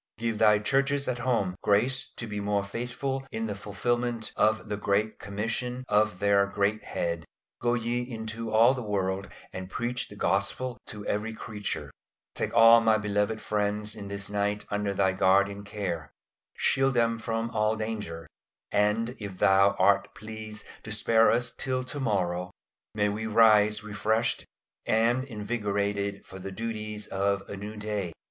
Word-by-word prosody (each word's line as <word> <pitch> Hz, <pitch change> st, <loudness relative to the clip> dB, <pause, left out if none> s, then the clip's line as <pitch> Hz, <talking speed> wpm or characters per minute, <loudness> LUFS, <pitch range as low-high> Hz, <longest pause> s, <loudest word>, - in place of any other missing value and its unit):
Give 115 Hz, -1 st, -2 dB
thy 105 Hz, -1 st, +6 dB
Churches 135 Hz, +6 st, +1 dB
at 125 Hz, -1 st, -1 dB
home 115 Hz, -7 st, +1 dB
grace 125 Hz, +6 st, +2 dB
to 115 Hz, -, -4 dB
be 105 Hz, -2 st, -4 dB
more 100 Hz, 0 st, 0 dB
faithful 125 Hz, +6 st, -3 dB
in 110 Hz, 0 st, -2 dB
the 105 Hz, -, -2 dB
fulfilment 115 Hz, +3 st, -2 dB
of 110 Hz, -1 st, +2 dB
the 105 Hz, -, -2 dB
great 105 Hz, +1 st, 0 dB
commission 115 Hz, +5 st, -3 dB
of 105 Hz, -2 st, +2 dB
their 100 Hz, 0 st, +3 dB
Great 100 Hz, +2 st, 0 dB
Head 85 Hz, -1 st, -2 dB, 0.4 s
"Go 120 Hz, 0 st, +2 dB
ye 120 Hz, +1 st, -1 dB
into 115 Hz, -2 st, -5 dB
all 115 Hz, +4 st, +6 dB
the 130 Hz, -, -4 dB
world 100 Hz, -2 st, -1 dB, 0.3 s
and 95 Hz, 0 st, -6 dB
preach 120 Hz, +3 st, -2 dB
the 105 Hz, -, -12 dB
Gospel 100 Hz, +6 st, -1 dB
to 105 Hz, -1 st, -7 dB
every 110 Hz, +2 st, -2 dB
creature!" 105 Hz, -2 st, -5 dB, 0.4 s
Take -, -, -2 dB
all 115 Hz, 0 st, +8 dB
my 110 Hz, -1 st, +4 dB
beloved 105 Hz, +1 st, 0 dB
friends 105 Hz, 0 st, 0 dB
this 100 Hz, -2 st, -5 dB
night 105 Hz, 0 st, -1 dB
under 105 Hz, 0 st, 0 dB
Thy 95 Hz, -1 st, +3 dB
guardian 100 Hz, +2 st, +3 dB
care. 95 Hz, -7 st, -4 dB, 0.5 s
Shield 135 Hz, -1 st, +2 dB
them 115 Hz, -1 st, +2 dB
from 115 Hz, 0 st, -2 dB
all 110 Hz, 0 st, +1 dB
danger; 105 Hz, -7 st, -4 dB, 0.5 s
and 105 Hz, +3 st, +2 dB
if 100 Hz, -3 st, -6 dB
Thou 100 Hz, +1 st, +5 dB
art -, -, +3 dB
pleased 110 Hz, -1 st, -8 dB, 0.2 s
to 110 Hz, -, -8 dB
spare 110 Hz, +1 st, +4 dB
us 120 Hz, +1 st, +1 dB
till 130 Hz, -1 st, -1 dB
to 135 Hz, +3 st, -6 dB
morrow, 90 Hz, -7 st, 0 dB, 0.5 s
may 105 Hz, -1 st, +2 dB
we 110 Hz, +2 st, -3 dB
rise 105 Hz, -1 st, +5 dB
refreshed 110 Hz, +2 st, 0 dB, 0.4 s
and 115 Hz, +3 st, +2 dB
invigorated 100 Hz, -3 st, -2 dB
for 95 Hz, -, -10 dB
the 95 Hz, +1 st, -6 dB
duties 105 Hz, 0 st, -4 dB
of 100 Hz, 0 st, -1 dB
a -, -, -6 dB
new 105 Hz, +2 st, -7 dB
day. 105 Hz, -5 st, -3 dB
105 Hz, 155 wpm, -28 LUFS, 100-115 Hz, 0.5 s, all